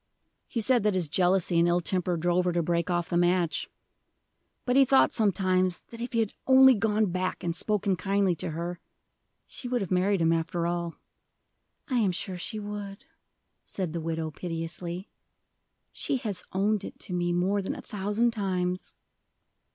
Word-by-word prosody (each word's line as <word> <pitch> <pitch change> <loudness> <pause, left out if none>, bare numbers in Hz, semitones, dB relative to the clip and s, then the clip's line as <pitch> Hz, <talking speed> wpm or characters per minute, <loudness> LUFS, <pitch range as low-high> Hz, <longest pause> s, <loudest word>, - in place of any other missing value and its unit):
He 230 - -2
said 245 +1 +3
that 210 -1 +1
his 180 -4 +1
jealousy 180 +1 +2
and 170 - +4
ill 175 0 +3
temper 180 0 -1
drove 175 +2 +1
her 180 - +2
to 170 -1 +1
break 170 +1 0
off 175 -1 0
the 175 - 0
match; 175 -1 +1 1.0
but 250 - +1
he 275 - +7
thought 270 0 +4
sometimes 185 -4 +1
if 235 +2 -6
he 230 - +2
had 220 - -2
only 265 0 +8
gone 215 -2 +1
back 185 +1 -2
and 170 -1 -1
spoken 200 +1 0
kindly 195 0 +1
to 165 - -4
her, 170 +2 -4 0.7
she 250 - -6
would 245 0 0
have 195 -4 -4
married 190 +2 +2
him 165 0 +3
after 165 +1 -1
all." 170 -1 -2 0.9
"I 255 -4 +1
am 205 -5 +2
sure 185 +1 -4
she 215 +5 -4
would," 205 0 -7 0.6
said 180 -5 -4
the 170 - -3
widow 160 -1 -3
piteously. 170 +2 -5 0.8
"She 275 - -1
has 210 -6 -4
owned 205 +2 +1
it - - -8
to 180 - -5
me 175 0 0
more 185 +4 +1
than 190 - -3
a - - -8
thousand 210 +4 0
times." 185 -4 -2
185 Hz, 175 wpm, -28 LUFS, 175-210 Hz, 1.0 s, only